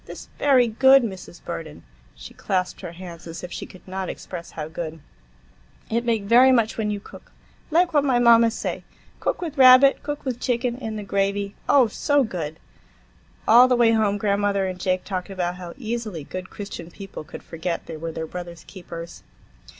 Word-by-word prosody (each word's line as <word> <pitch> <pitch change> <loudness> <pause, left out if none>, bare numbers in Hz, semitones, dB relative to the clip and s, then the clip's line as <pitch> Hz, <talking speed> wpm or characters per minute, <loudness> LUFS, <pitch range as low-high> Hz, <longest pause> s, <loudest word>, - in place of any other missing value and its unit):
"This - - -10
very 265 -4 +5
good, 265 +4 +6
Mrs. 190 -5 -7
Burden,"—she - - -10
clasped 185 -1 -2
her 175 -3 -7
hands 170 -1 -10
as 165 +1 -8
if 180 - -7
she - - -6
could 185 - -16
not 190 0 -4
express 170 -2 -7
how 155 -1 -3
good,—"it 60 - -8
make 230 -3 0
very 245 +5 +6
much 230 -3 +2
when 215 -2 -1
you 205 -1 -2
cook, - - -14 0.4
like 340 +2 +2
what 290 -2 +4
my 265 -4 +2
mama 235 -1 +6
say. 225 - -4 0.4
Cook - - -2
with 310 -4 -5
rabbit, 260 +1 +8
cook 290 -1 -5
with 250 -2 -3
chicken, 245 -1 -1
in 220 -4 -5
the 210 - -5
gravy,—oh, 200 +6 +1
so 285 +6 +1
good!" 165 -8 -5 0.9
All 240 +3 +8
the 255 - +3
way 235 -1 +4
home 215 -2 +2
grandmother 200 -1 +1
and 185 -1 -4
Jake 185 0 0
talked 185 -2 -4
about 180 -2 -3
how 175 -2 -8
easily 225 - -4
good 185 +5 -7
Christian 200 -5 -8
people 195 -2 -9
could - - -10
forget 165 +1 -4
they 165 - -7
were 165 +1 -5
their 160 0 -4
brothers' 175 0 -8
keepers. 170 -3 -9
200 Hz, 180 wpm, -23 LUFS, 170-235 Hz, 0.9 s, rabbit